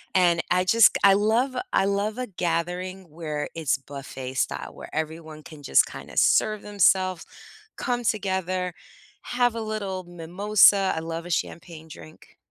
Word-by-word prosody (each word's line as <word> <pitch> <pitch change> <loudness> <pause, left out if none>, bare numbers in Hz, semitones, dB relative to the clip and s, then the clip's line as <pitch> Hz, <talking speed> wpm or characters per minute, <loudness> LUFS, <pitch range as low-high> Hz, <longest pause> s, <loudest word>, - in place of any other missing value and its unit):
and 175 -2 +4
I 180 0 +2
just 225 0 +5
g - - -2
I 200 - +8
love 225 +6 +1 0.2
I - - +3
love 200 +3 -1
a 255 - -2
gathering 180 +1 -3
where 150 -2 -5
it's 155 -4 0
buffet 135 -1 -8
style, - - -2
where - - -12
everyone 160 -1 -5
can 155 -3 -12
just 70 - +4
kinda - - -10
serve 215 -1 +3
themselves, 185 -3 +2 0.5
come 245 -1 -2
together, 190 -4 -1 0.5
have 245 -1 0
a 230 - -4
little 205 -4 -4
mimosa. 190 +3 +3
I - - -1
love 165 +1 -6
a - - -8
champagne 165 -1 -4
drink. 80 - -14
180 Hz, 155 wpm, -25 LUFS, 165-205 Hz, 0.5 s, I